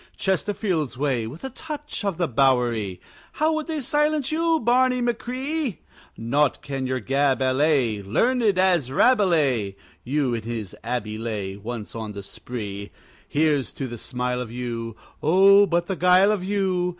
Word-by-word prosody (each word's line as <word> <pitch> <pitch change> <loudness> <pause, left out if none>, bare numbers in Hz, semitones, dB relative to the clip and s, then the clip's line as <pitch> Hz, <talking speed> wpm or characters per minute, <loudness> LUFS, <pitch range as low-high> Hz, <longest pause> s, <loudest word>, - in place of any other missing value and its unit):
Chesterfield's 185 - -1
way, 130 -5 0
with 145 +9 -10
a 265 - -5
touch 295 -5 -6
of 195 -5 -1
the 175 -2 +1
Bowery! 120 -7 +1 0.3
How 315 +1 +1
would 315 0 -2
they 315 -3 -2
silence 295 +1 +1
you, 325 0 +2
Barney 250 +1 +3
machree? 250 - -2 0.4
Naught 140 +6 +1
can 135 -3 -3
your 130 0 -1
gab 135 +2 +1
allay, 130 -4 +2
Learned 240 - +1 0.2
as 175 -8 +2
Rabelais 150 - +3 0.3
(You 135 -1 0
in 115 - -2
his 110 -3 -5
abbey 110 -3 -3
lay 105 -4 -4
Once 110 +1 -6
on 110 -2 -5
the 100 0 -7
spree). 100 -2 -6 0.4
Here's 150 -3 +1
to 135 - -4
the 120 -2 -7
smile 125 +1 -2
of 120 -3 -6
you, 115 -2 -4 0.3
(Oh, 195 +5 +6
but 170 0 +1
the 190 - -2
guile 180 +3 +5
of 205 -4 -1
you!) 190 -2 0
145 Hz, 155 wpm, -24 LUFS, -, 0.4 s, Oh